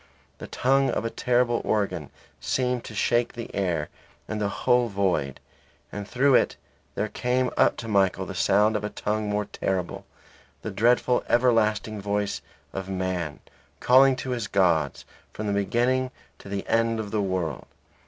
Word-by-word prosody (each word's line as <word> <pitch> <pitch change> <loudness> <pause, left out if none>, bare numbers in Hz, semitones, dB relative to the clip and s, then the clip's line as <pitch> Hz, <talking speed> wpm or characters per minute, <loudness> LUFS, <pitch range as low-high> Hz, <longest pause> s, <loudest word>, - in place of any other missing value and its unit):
The - - -7
tongue 135 +2 +2
of - - -1
a 115 - -2
terrible 120 -1 +1
organ 105 -2 -1 0.3
seemed 125 -2 -1
to 110 - -8
shake 120 +3 +1
the 115 -1 -6
very 100 - 0
air 80 -4 -1 0.4
in 110 - -3
the 100 -1 0
whole 120 +4 +2
void; 95 - -1 0.5
and 100 -1 -6
through 135 +4 +3
it - - +3 0.4
there 105 - -1
came 125 +3 0
up - - +3
to 115 - -6
Michael 95 -3 +2
the 95 - -6
sound 105 +3 +3
of 105 - -1
a 105 - -2
tongue 105 0 -2
more 105 0 0
terrible; 95 -3 -3 0.6
the - - -4
dreadful 120 +4 +2
everlasting 110 -3 +2
voice 100 0 -1 0.3
of 95 0 -5
man, 90 -5 -3 0.4
calling 130 +1 +6
to 130 +1 -5
his 120 -4 -2
gods 85 -8 +1 0.3
from 110 - -5
the 100 - 0
beginning 120 +6 +1 0.3
to - - -12
the 100 -1 -3
end 115 0 +1
of 105 -2 -5
the 110 - 0
world. 95 -4 -2
105 Hz, 165 wpm, -25 LUFS, 100-120 Hz, 0.6 s, calling